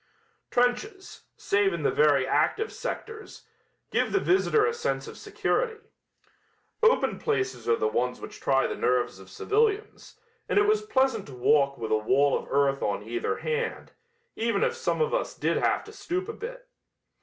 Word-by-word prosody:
Trenches, 245 - -1
save 200 -1 +1
in 170 -3 -4
the - - +2
very 145 -3 +3
active 160 - 0
sectors, 440 -1 -7 0.5
give - - +1
the 390 - +2
visitor 390 +4 +3
a 460 - 0
sense 470 +1 -2
of - - -9
security. 455 -3 -1 1.0
Open 460 +1 +3
places 400 - -2
are 115 - +5
the 110 - 0
ones 125 +3 -1
which - - -10
try 135 -1 +2
the - - -2
nerves 125 -6 0
of 95 0 -14
civilians, 430 - -1 0.3
and - - +1
it 410 - +5
was 425 0 +3
pleasant 265 - 0
to 135 - -10
walk 140 +2 +3
with 115 -2 -5
a 110 - +4
wall 135 +6 +2
of - - -4
earth 140 0 +2
on 100 0 -1
either 120 +2 -2
hand, 470 0 -3 0.4
even 230 - 0
if 480 -1 +1
some 475 0 -1
of 465 +1 +1
us - - -1
did - - 0
have - - +1
to - - -12
stoop 365 +2 -3
a 450 - -4
bit. - - -8
260 Hz, 175 wpm, -27 LUFS, -, 1.0 s, are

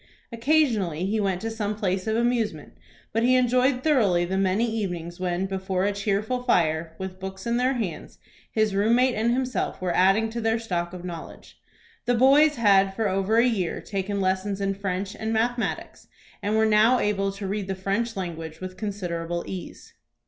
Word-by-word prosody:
Occasionally 230 - +1
he 215 +3 0
went 190 -3 0
to 225 - -3
some 210 -2 -2
place 190 -2 -2
of 220 - +1
amusement, 230 -9 -1 0.4
but 225 - +1
he 250 +2 +4
enjoyed 255 +1 +2
thoroughly 205 - +3
the 185 +2 -2
many 195 +4 +2
evenings 175 -6 -4
when, 180 0 -1
before 190 -1 -2
a 205 - +2
cheerful 210 +5 -1
fire, 160 -8 +1
with 190 0 -6
books 190 0 -7
in 235 0 +1
their 255 +2 +2
hands, 220 -9 -5 0.3
his 215 -2 +1
room 210 +4 +3
mate 255 +1 +3
and 230 +1 +1
himself 255 +1 -1
were 180 -1 -1
adding 195 +5 +3
to 235 +1 -4
their 225 0 +1
stock 175 -6 -3
of 180 -1 -8
knowledge. 170 -2 -9 0.4
The 245 - +2
boys 285 +5 +5
had 195 -4 +4
for 220 0 0
over 195 +4 +1
a 235 - +5
year 200 -9 0
taken 200 0 -3
lessons 190 +1 0
in 195 0 0
French 195 0 -3
and 220 0 -3
mathematics, 235 +2 -2 0.3
and 210 +2 0
were 220 - +4
now 220 +3 +5
able 195 -3 0
to 200 0 -7
read 200 0 -3
the 190 - -2
French 200 +5 -2
language 165 -3 -5
with 185 0 -7
considerable 175 -5 -3
ease. 185 -2 -8
200 Hz, 185 wpm, -25 LUFS, 185-230 Hz, 0.4 s, boys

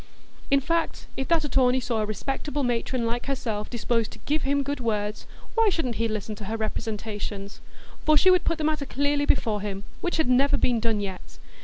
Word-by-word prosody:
In 275 - +5
fact, 330 +4 -1
if 265 - -2
that 335 -2 +3
attorney 260 -2 +3
saw 235 -3 -1
a 210 - -1
respectable 275 +6 -2
matron 240 0 0
like 240 +3 -2
herself 225 -6 -2
disposed 230 -1 0
"to - - -12
give 300 +1 +1
him 280 +1 +1
good 285 +1 -2
words," 210 -2 -2 0.3
why 455 -2 +4
shouldn't 280 - -1
he 230 - +1
listen 215 -1 -3
to 205 - -7
her 220 +3 -2
representations? 210 -2 -4 0.4
For 305 0 +5
she 370 +5 +6
would 365 -1 +4
put 335 - 0
the 315 - -3
matter 300 -2 0
clearly 285 +2 +1
before 215 -6 +2
him, 200 -1 -4 0.2
which 350 - 0
had 315 - +2
never 275 +3 +4
been 245 -4 +2
done 220 -2 +1
yet. 190 -2 -7
245 Hz, 200 wpm, -26 LUFS, 215-285 Hz, 0.4 s, she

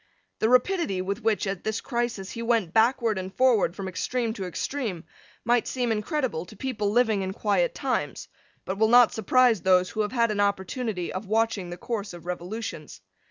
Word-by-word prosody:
The 220 - +2
rapidity, 250 - +2
with 200 +4 -3
which, 220 -2 +1
at 195 -2 -3
this 220 0 -1
crisis, 235 -6 -3
he 230 - -6
went 230 -7 +1
backward 225 -2 +3
and 185 0 -6
forward 240 -6 +3
from 195 -2 -5
extreme 230 +5 -2
to 195 -5 -5
extreme, 195 - -3 0.4
might 240 0 +2
seem 245 -3 -1
incredible 225 - -1
to 215 - -12
people 220 -5 -2
living 220 -2 +2
in 190 0 -3
quiet 225 - +1
times, - - -2 0.4
but 190 +1 -4
will 220 - +5
not 240 +1 +6
surprise 230 -1 +3
those 185 -1 +3
who 215 - -1
have 210 - -1
had 235 -3 +2
an 205 - -2
opportunity 200 0 -1
of 190 +2 -5
watching 220 -3 0
the 175 - -6
course 205 -1 -4
of 175 -1 -11
revolutions. 175 - -6
220 Hz, 185 wpm, -26 LUFS, 190-240 Hz, 0.4 s, not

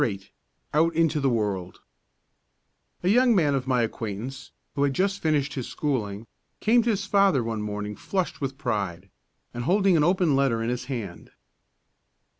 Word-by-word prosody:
VIII 100 -3 -3 0.4
OUT 165 +2 +3
INTO 160 -2 +2
THE 135 -1 +2
WORLD 100 -6 -2 1.2
A - - 0
young 245 +2 +5
man 150 -6 +3
of 135 -1 -2
my 125 -2 +2
acquaintance, 115 +3 -5 0.2
who 140 - -2
had 140 -1 +2
just 195 +1 0
finished 150 -3 +1
his 130 -3 -4
schooling, 110 -8 -2 0.3
came 235 +2 +4
to 235 - -1
his 200 -3 0
father 195 - +3
one 115 -1 -3
morning, 105 0 -4
flushed 185 - -3
with 135 -1 -3
pride, 100 - -3 0.4
and 120 0 -4
holding 195 +2 +3
an 155 - +4
open 175 -3 +3
letter 130 -5 +1
in 115 - -1
his 125 0 -3
hand. 115 -9 -6
135 Hz, 165 wpm, -26 LUFS, 110-170 Hz, 1.2 s, young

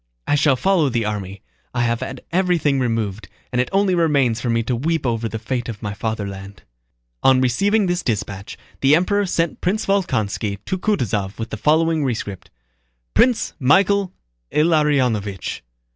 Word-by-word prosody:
I - - 0
shall 145 -1 +4
follow 170 0 +2
the 120 -3 -1
army. 100 -2 -5 0.3
I 120 - +1
have 115 -1 0
had 130 0 -6
everything 170 -6 +2
removed, 115 -4 -2 0.2
and 125 - +2
it 125 - -2
only 195 -1 +2
remains 140 -9 +2
for 120 - -2
me 115 0 +1
to 125 +2 -1
weep 155 +4 -1
over 115 -2 -1
the 110 - -4
fate 120 +2 -3
of 115 -1 -7
my 100 -1 -3
fatherland. 100 -4 -5 0.6
On 130 -1 +5
receiving 200 - +2
this 175 0 0
dispatch 105 - -4 0.2
the 135 +2 +5
Emperor 200 +4 +1
sent 165 -2 -1
Prince 195 +4 0
Volkónski 110 - 0
to 190 - -2
Kutúzov 105 - -1
with 115 +1 -5
the - - -2
following 160 0 +2
rescript: 105 -7 -4 0.6
Prince 245 -2 +3
Michael 190 +7 +3 0.4
Ilariónovich! 135 - +1
130 Hz, 160 wpm, -21 LUFS, 110-170 Hz, 0.6 s, On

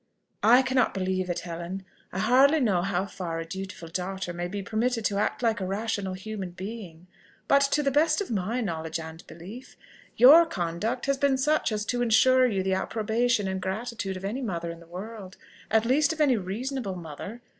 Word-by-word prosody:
"I 245 +5 +6
cannot 260 -3 +1
believe 185 -1 -1
it, 175 0 -2
Helen. 175 +3 -6 0.3
I - - -6
hardly 260 +9 +5
know 205 -9 +2
how 190 0 -1
far 175 -4 -5
a 165 - -4
dutiful 185 0 -7
daughter 180 +1 -4
may 175 0 -3
be 200 +2 -5
permitted 225 +2 -1
to 200 -1 +1
act 210 - -1
like 225 -3 +1
a - - -1
rational 200 -1 -2
human 195 -1 -6
being; 185 -3 -8 0.4
but 280 0 +5
to 295 +1 +1
the 275 - +1
best 305 +3 +3
of 405 - -4
my 220 +4 -1
knowledge 160 -5 -3
and 160 +1 -9
belief, 200 +10 -11 0.4
your 305 +8 +8
conduct 205 - -2
has 275 -1 0
been 280 -2 +3
such 300 0 +1
as 210 0 -2
to 245 +1 -1
ensure 255 +2 +5
you 195 -5 -1
the 190 0 0
approbation 220 +2 0
and 190 0 -3
gratitude 195 0 -3
of 190 - -7
any 230 +7 -3
mother 170 -8 -3
in 170 - -10
the 170 - -16
world 190 +2 -8 0.3
at 220 0 +3
least 280 +5 +3
of 320 - -11
any 285 -5 +4
reasonable 215 +2 -3
mother. 175 +7 -8
205 Hz, 195 wpm, -27 LUFS, 185-245 Hz, 0.4 s, your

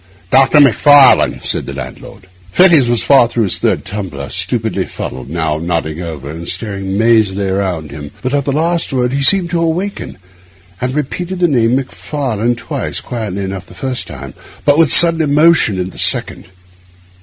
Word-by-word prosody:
'Doctor 135 +3 +4
Macfarlane,' 145 0 +5
said - - -3
the 70 - -6
landlord. 70 +6 -10 0.3
Fettes 170 - +5
was 120 -1 +1
far 135 -4 +4
through 115 -1 -1
his 100 - 0
third - - -1
tumbler, 85 -10 -6
stupidly - - -1
fuddled, 65 0 -8
now 80 -1 -2
nodding 80 -1 -3
over, 75 -4 -7
now 80 +1 -8
staring 100 0 -3
mazily 105 -3 +2
around 95 -6 -3
him; 75 0 -8
but 130 +1 -2
at 140 -2 0
the 140 - -1
last 165 +4 -1
word 125 -1 -1
he 140 - -1
seemed 175 +4 +3
to 170 -1 0
awaken, 175 - -3 0.6
and 125 +2 -2
repeated 175 +6 -4
the 175 -1 +2
name 120 -5 +1
'Macfarlane' 130 -3 -3
twice, 115 -1 -5
quietly 105 -5 -5
enough 95 -1 -6
the - - -15
first 130 -2 -4
time, 70 -1 -9 0.3
but 145 - +4
with 165 -3 +3
sudden 165 -1 +6
emotion 150 - +3
at 90 +1 -4
the - - -12
second. - - +1
120 Hz, 170 wpm, -14 LUFS, 90-145 Hz, 0.6 s, sudden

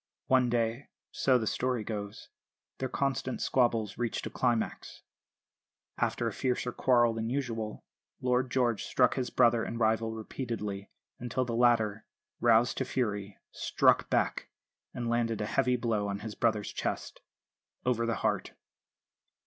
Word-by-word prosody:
One 130 -2 +3
day, 115 +2 -1 0.2
so 130 -2 +3
the 115 - -2
story 125 +1 0
goes, 105 -1 -6 0.5
their 130 - -2
constant 135 -1 -1
squabbles 115 -5 +1
reached 120 -2 -2
a - - -5
climax. 120 -3 -1 1.0
After - - 0
a - - -2
fiercer 125 -1 -1
quarrel 120 -2 +3
than 115 0 -3
usual 115 -5 -3 0.4
Lord 125 0 +1
George 120 -4 +1
struck 125 - +3
his 130 -2 -2
brother 120 -2 +4
and 115 - -4
rival 110 0 +2
repeatedly, 110 -3 -5 0.3
until 125 +1 -1
the 120 - -3
latter, 110 -3 +2 0.3
roused 120 +1 +4
to - - +1
fury, 105 -6 -2
struck - - +2
back - - 0 0.4
and 120 -1 -4
landed 115 -1 0
a 105 - -1
heavy 125 +3 +2
blow 115 -4 0
on 100 0 -3
his 110 0 -5
brother's 110 -3 0
chest, - - -4 0.6
over 115 -2 +1
the 115 - 0
heart. - - 0
115 Hz, 140 wpm, -30 LUFS, 110-125 Hz, 1.0 s, brother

